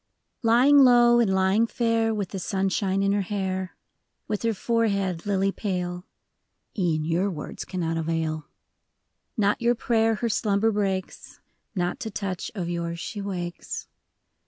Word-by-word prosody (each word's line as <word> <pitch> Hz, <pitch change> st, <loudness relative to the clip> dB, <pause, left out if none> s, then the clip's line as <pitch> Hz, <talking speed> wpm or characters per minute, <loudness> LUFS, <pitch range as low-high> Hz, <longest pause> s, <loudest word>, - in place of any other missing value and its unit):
YING 250 Hz, +6 st, +6 dB
low 240 Hz, -2 st, +6 dB
and 225 Hz, -5 st, +3 dB
lying 190 Hz, +4 st, +3 dB
fair, 230 Hz, -1 st, +1 dB
With 205 Hz, -4 st, -2 dB
the 195 Hz, -, -5 dB
sunshine 195 Hz, +1 st, 0 dB
in 195 Hz, -, +2 dB
her 205 Hz, 0 st, +1 dB
hair, 190 Hz, -2 st, -3 dB, 0.5 s
With 210 Hz, -, -2 dB
her 230 Hz, -1 st, 0 dB
forehead 200 Hz, -5 st, 0 dB
lily 195 Hz, -1 st, +1 dB
pale 180 Hz, -2 st, -3 dB, 0.7 s
(E'en 165 Hz, -6 st, 0 dB
your 175 Hz, +5 st, +1 dB
words 170 Hz, -6 st, -6 dB
cannot 165 Hz, -3 st, -2 dB
avail) 160 Hz, -1 st, -2 dB, 0.5 s
— -, -, -52 dB
Not 205 Hz, 0 st, +2 dB
your 240 Hz, +1 st, +3 dB
prayer 225 Hz, -1 st, +2 dB
her 235 Hz, -, -2 dB
slumber 215 Hz, 0 st, +1 dB
breaks; 195 Hz, -3 st, -3 dB, 0.4 s
Not 180 Hz, -1 st, -1 dB
to 230 Hz, -, -4 dB
touch 195 Hz, -3 st, -4 dB
of 180 Hz, -4 st, -3 dB
yours 170 Hz, -1 st, -3 dB
she 205 Hz, +4 st, -5 dB
wakes. 175 Hz, -3 st, -5 dB
195 Hz, 145 wpm, -25 LUFS, 180-225 Hz, 0.7 s, YING